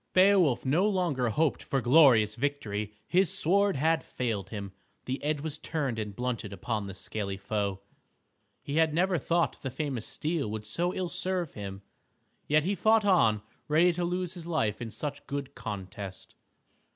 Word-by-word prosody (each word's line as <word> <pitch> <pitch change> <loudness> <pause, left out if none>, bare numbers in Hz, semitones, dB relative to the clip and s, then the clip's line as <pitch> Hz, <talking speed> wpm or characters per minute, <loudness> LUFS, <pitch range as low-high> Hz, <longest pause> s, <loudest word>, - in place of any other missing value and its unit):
Beowulf 185 -9 +5
no 165 +10 +3
longer 165 - 0
hoped 150 +6 +1
for 135 - -1
glorious 125 -6 +6
victory. 115 -7 -2
His 185 -2 +2
sword 200 +4 +2
had 160 +4 +2
failed 110 -7 -3
him. 100 -3 -6 0.3
The 130 +2 -3
edge 150 -1 0
was 155 0 -4
turned 140 -8 -2
and 105 -2 -4
blunted 120 -3 -3
upon 105 0 -3
the 95 - -7
scaly 100 -1 -4
foe. 100 -1 -2 0.8
He 145 +1 -3
had 160 -2 +3
never 180 0 +2
thought 170 +4 0
the 135 - -3
famous 130 -3 -3
steel 155 -6 -2
would 105 0 -5
so 175 +11 0
ill 185 -1 -3
serve 180 -2 -1
him. 100 -1 -7 0.6
Yet 150 0 +4
he 190 +5 0
fought 220 +1 +3
on 110 - +4 0.2
ready 170 +4 +4
to 175 +1 -2
lose 180 +1 -2
his 170 -2 -9
life 110 -11 0
in 115 - -4
such 145 +5 -5
good 140 -1 -4
contest. 95 -1 -7
140 Hz, 165 wpm, -29 LUFS, 110-170 Hz, 0.8 s, glorious